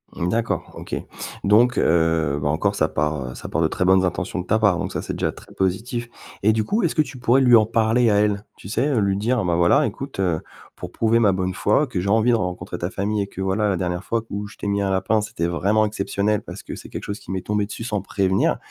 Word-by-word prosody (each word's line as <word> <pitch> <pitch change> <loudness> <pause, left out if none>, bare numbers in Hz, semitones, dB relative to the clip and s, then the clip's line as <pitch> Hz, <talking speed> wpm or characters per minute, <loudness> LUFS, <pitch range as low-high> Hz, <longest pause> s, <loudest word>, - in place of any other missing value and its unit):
D'accord. 115 +7 -1
OK - - -6 0.5
donc 115 +5 +4
heu, 80 -3 +2
bah, 75 - 0
encore, 90 +7 +1
ça 80 -6 +1
part, 75 -4 -1
heu - - -10
ça - - -8
part 80 - -1
de 80 - +4
très 90 - -1
bonnes 95 0 +5
intentions 90 +1 -2
de 90 - -4
ta 110 - +2
part, 100 -5 +3
donc - - -3
ça, - - -3
c'est - - -4
déjà - - -1
très - - -15
positif 115 +6 -2 0.3
et 105 - +4
du 110 0 +1
coup, 210 - 0
est-ce 170 - 0
que 155 - +4
tu 130 -2 -10
pourrais 120 +2 +3
lui 125 -2 +6
en 110 -2 +5
parler 115 +1 +2
à 105 - +3
elle? 105 0 +1
Tu 95 - -11
sais, 120 +6 +1
heu, 135 -6 +1
lui 100 -1 +1
dire: 115 +3 0
«Bah, 85 -1 +1
voilà, 85 - +4
écoute, 135 -6 -6
heu, 90 -5 +1 0.3
pour - - -8
prouver 115 +1 +2
ma 105 -4 +4
bonne 95 0 -1
foi, 105 +10 +2
que 125 -9 -4
j'ai 95 +2 -2
envie 110 +3 +4
de - - +4
rencontrer 90 -3 -3
ta 85 - -2
famille 100 +2 -1
et 100 - -2
que, 95 - -12
voilà, 95 +2 +1
la 95 - 0
dernière 90 0 -2
fois 115 +3 -1
où 100 +1 -4
je 100 - -15
t'ai - - -7
mis 100 0 0
un 100 - 0
lapin, 100 +3 +1
c'était 85 -5 -3
vraiment 100 +5 +2
exceptionnel 105 0 -1
parce 90 -1 -9
que - - -7
c'est - - -11
quelque - - -6
chose 100 +1 -5
qui - - -18
m'est 95 -1 -2
tombé 105 -1 0
dessus 105 +2 -7
sans 105 -4 -2
prévenir». 95 0 +1
100 Hz, 265 wpm, -22 LUFS, 90-110 Hz, 0.5 s, lui